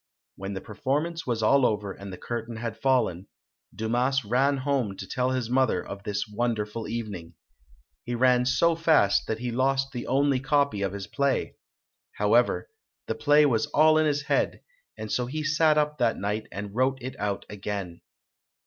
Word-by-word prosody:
When 95 +1 -6
the 95 - -5
performance 150 +4 -2
was 115 -3 -1
all 135 +5 +4
over 105 -4 0
and 100 0 -9
the 90 - -7
curtain 120 -1 -5
had 115 -1 -4
fallen, 125 -9 +1 0.5
Dumas 120 +4 0
ran 135 +6 +2
home 130 -7 -1
to 95 - -6
tell 125 0 0
his 130 -3 -1
mother 125 -6 +1
of 100 0 -7
this 105 +1 -3
wonderful 110 0 -2
evening. 105 -8 -5 0.7
He 120 - -3
ran 125 0 +3
so 170 +5 +3
fast 160 -12 +3
that 110 - -1
he 120 +1 -4
lost 135 +2 +1
the 120 -2 -6
only 140 0 +2
copy 140 -5 +1
of 100 -1 -1
his 100 -1 -5
play. 140 +3 -1 0.6
However, - - +2 0.4
the - - -2
play 150 0 +4
was 115 -6 +1
all 155 +1 +4
in 155 - +3
his 145 -1 0
head - - 0 0.4
and 110 - -6
so 125 -1 0
he 155 +4 -3
sat 155 0 +3
up 150 -1 0
that 120 -2 +2
night 105 +2 -3
and 100 0 -6
wrote 130 +3 +1
it 130 +1 -6
out 100 -1 -2
again. 100 -4 -5
120 Hz, 175 wpm, -26 LUFS, 105-140 Hz, 0.7 s, all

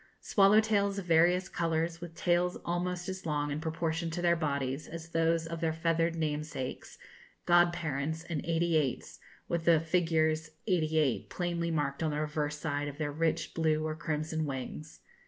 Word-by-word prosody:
Swallow 200 +1 +5
tails, 200 -2 +1
of 195 - -4
various 175 +3 +4
colours, 165 0 -1
with 170 -1 -8
tails 175 0 +1
almost 175 +1 -2
as 190 0 -5
long, 145 -1 0
in 150 +2 -3
proportion 165 +1 -2
to 165 +2 -4
their 170 0 +4
bodies, 140 -3 -2
as 165 0 -8
those 165 0 +1
of 165 0 -5
their 165 -1 +1
feathered 165 +1 +1
namesakes; 150 -4 -4 0.5
god 175 0 +5
parents 160 -1 -3
and 165 -4 -4
'eighty 165 0 +1
eights,' 140 -5 -2 0.3
with 170 -1 -2
the 165 -2 +6
figures 160 -1 +1 0.2
88 155 - +1
plainly 170 -1 -2
marked 145 -3 -1
on 160 - +1
the 150 0 -2
reverse 150 -1 -2
side 145 -1 -2
of 145 -1 -7
their 150 -1 -2
rich 160 +1 -1
blue 155 -1 +1
or 155 0 -2
crimson 155 0 -2
wings. 140 +3 -6
160 Hz, 170 wpm, -31 LUFS, 155-170 Hz, 0.5 s, the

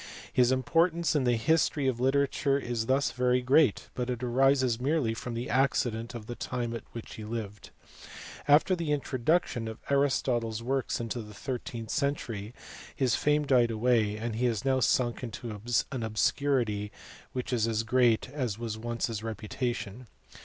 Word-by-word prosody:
His 125 0 +4
importance 165 +6 +2
in 140 -3 +2
the 120 -1 +3
history 145 +4 +2
of 125 -3 0
litera 140 +2 +3
ture 140 0 0
is 120 -4 -3
thus 135 +2 +2
very 125 0 +2
great, 130 -1 +3
but 125 0 -3
it 125 0 -3
arises 130 -1 +2
merely 135 -4 +1
from 115 +1 -5
the 120 +2 -3
accident 120 -3 0
of 115 -2 -7
the 120 - -5
time 120 -1 -3
at 115 - -5
which 115 - -8
he 110 - -7
lived. 105 -2 -6 0.8
After 150 +6 +5
the 165 -4 -2
introduction 135 -3 0
of 110 0 -6
Aristotle 135 -4 +2
s 110 +1 -5
works 135 +1 -1
in 115 -1 -4
the 105 -3 -5
thirteenth 115 -2 -5
century 120 -8 -2 0.4
his 130 -4 +1
fame 150 +3 +2
died 125 -4 +4
away, 110 -2 +1
and 115 0 -3
he 125 - +1
has 115 0 -2
now 130 -1 +3
sunk 120 -1 +1
into 120 -1 -6 0.4
an 130 -3 -3
obscurity 110 -1 0 0.4
which 125 +1 -3
is 115 -2 +2
as 115 -1 0
great 120 0 +3
as 125 -6 -3
was 115 -2 -4
once 120 0 -2
his 110 -3 -4
reputation. 115 +1 -4
120 Hz, 170 wpm, -29 LUFS, 115-135 Hz, 0.8 s, After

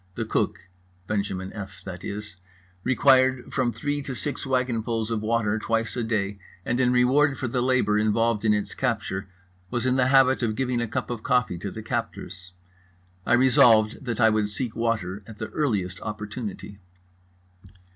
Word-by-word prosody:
The - - -2
cook 90 - -1 0.4
(Benjamin 95 -2 -3
F., 100 -2 -8
that 90 -1 -8
is) 105 -1 -6 0.5
required 130 +1 +3
from 130 -3 +1
three 145 +6 -2
to 135 -2 -5
six 140 +1 -4
wagonfuls 115 -3 -1
of 110 -2 -1
water 110 -1 0
twice 115 0 -1
a 125 - -1
day, 105 -3 -1 0.3
and 120 - 0
in 125 -1 +3
reward 130 +3 +3
for 130 - -2
the 125 +1 -1
labour 125 -4 +2
involved 110 +1 +1
in 110 - +3
its 105 -1 0
capture 105 -6 -2 0.4
was 120 +3 -2
in 130 - +3
the 130 -1 +3
habit 130 -1 +5
of 110 -3 0
giving 125 -1 0
a 120 - -1
cup 110 - -3
of 120 -3 -4
coffee 125 -9 +1
to 100 - -4
the 110 +2 -8
captors. 100 -5 -5 0.8
I - - +3
resolved 120 -3 +5
that 120 -2 -3
I 110 -1 +6
would 105 -1 +1
seek 110 +2 -3
water 110 -4 -1
at 110 -2 -11
the 110 - -5
earliest 100 -10 -1
opportunity. 105 -1 -6
115 Hz, 170 wpm, -25 LUFS, 105-125 Hz, 0.8 s, I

